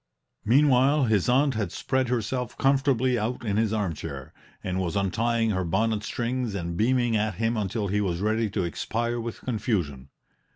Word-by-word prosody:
Meanwhile, 135 +3 +4
his 110 -3 +2
aunt 135 +2 +3
had 105 -5 -2
spread 130 +5 -1
herself 125 0 -2
comfortably 135 -2 +2
out 120 +3 -3
in 105 -1 0
his 110 -1 +1
armchair, 100 -8 -4 0.3
and 95 0 -2
was 90 -3 -2
untying 115 +3 +1
her 95 -2 -1
bonnet 105 +5 0
strings 120 -1 -2
and 85 -3 -3
beaming 120 +3 +2
at 105 -1 0
him 115 +3 0
until 105 0 -2
he 105 +2 0
was 90 -4 -1
ready 110 +2 0
to 100 -1 -1
expire 115 +7 -2
with 115 0 -6
confusion. 90 - -2
110 Hz, 165 wpm, -26 LUFS, 100-125 Hz, 0.3 s, Meanwhile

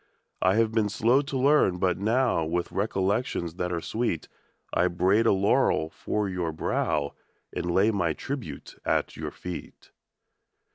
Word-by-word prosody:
I 95 +1 +3
have 115 0 +3
been 110 -2 +1
slow 120 +6 +3
to 140 -1 -4
learn, 135 -9 +4
but 90 0 +1
now, 115 -3 +2
With 85 +2 -2
recollections 100 -3 -1
■ - - -23
that 90 -1 -2
are 85 -1 -2
sweet, 110 -9 -2 0.5
I 90 - +3
braid 95 +6 +2
a - - +6
laurel 95 -4 +2
for 105 +4 -2
your 90 -3 -2
brow 75 -1 -1 0.4
And 85 - -3
lay 95 +5 +3
my 85 -6 0
tribute 135 - -6
at - - 0
your - - -5
eet. 90 -1 -7
95 Hz, 155 wpm, -27 LUFS, 85-115 Hz, 0.5 s, a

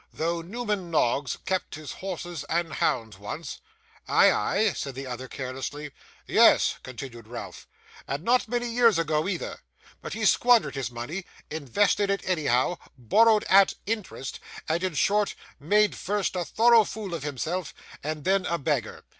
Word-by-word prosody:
'Though 170 +1 -2
Newman 205 -1 -3
Noggs 140 -3 +1
kept 185 -5 -2
his 155 -1 -8
horses 175 -4 -5
and 165 -1 -1
hounds 110 -5 -1
once.' 125 +11 -6 0.5
'Ay, - - +6
ay?' 210 -1 +1
said 135 -2 -5
the 135 +1 -6
other 130 0 -6
carelessly. 135 +3 -6 0.3
'Yes,' - - +5
continued 120 -3 -9
Ralph, 120 +1 -8 0.4
'and 140 +3 -3
not 245 +3 +2
many 240 +1 -1
years 230 -4 +4
ago 155 0 0
either; 185 -4 -4 0.4
but - - -6
he - - -2
squandered 235 - +4
his 135 -4 -3
money, 125 +11 -6 0.3
invested 180 - +1
it 200 -1 -1
anyhow, 155 -2 +1 0.2
borrowed 215 - +4
at 195 0 +5
interest, 210 - -4 0.3
and 165 +3 0
in 185 -4 -1
short 205 +7 +2 0.2
made 205 +8 +3
first 205 -1 -2
a 180 -1 -1
thorough 230 +2 +5
fool 205 -3 -6
of 165 - -3
himself, 150 +4 -3 0.3
and 155 0 -4
then 190 +1 +2
a 170 - 0
beggar. 140 -7 -2
170 Hz, 155 wpm, -26 LUFS, 140-200 Hz, 0.5 s, Ay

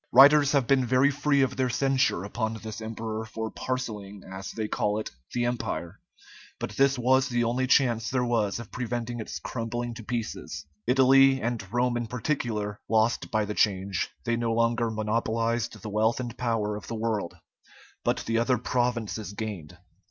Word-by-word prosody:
Writers 140 +3 +8
have 140 -3 +3
been 135 +1 +3
very 130 +3 +4
free 140 0 +2
of 130 -1 -1
their 130 -1 +1
censure 130 -6 +1
upon 110 +2 -2
this 110 0 -7
emperor 110 0 -4
for 110 0 -5
parcelling, 105 -6 -4
as 95 +1 -7
they 110 -1 -3
call 105 0 0
it, 110 - -4 0.2
the 120 0 0
Empire; 105 -6 -3 0.6
but - - -4
this 135 +4 +3
was 130 +2 +3
the 120 -1 +1
only 125 +3 0
chance 120 -5 +3
there 125 -1 +1
was 110 -4 +1
of 115 -2 -9
preventing 120 -1 -3
its 110 - -5
crumbling 120 0 -4
to 115 - -9
pieces. 105 - -4 0.2
Italy, 135 +1 +6
and 115 -6 -3
Rome 120 0 +1
in 120 -1 -3
particular, 110 -5 -2
lost 110 +2 +2
by 110 -1 +1
the 105 - -3
change: 95 -3 +1 0.2
they 120 -1 +1
no 115 -1 -1
longer 115 0 +2
monopolized 115 +1 -1
the 105 - -7
wealth 110 +3 +1
and 120 -2 -4
power 115 -4 -1
of 105 - -8
the 115 - -4
world, 110 -5 -2 0.7
but - - +1
the 115 0 +1
other 125 +2 +2
provinces 115 -4 -1
gained. 100 -6 -6
115 Hz, 175 wpm, -27 LUFS, 110-125 Hz, 0.7 s, Writers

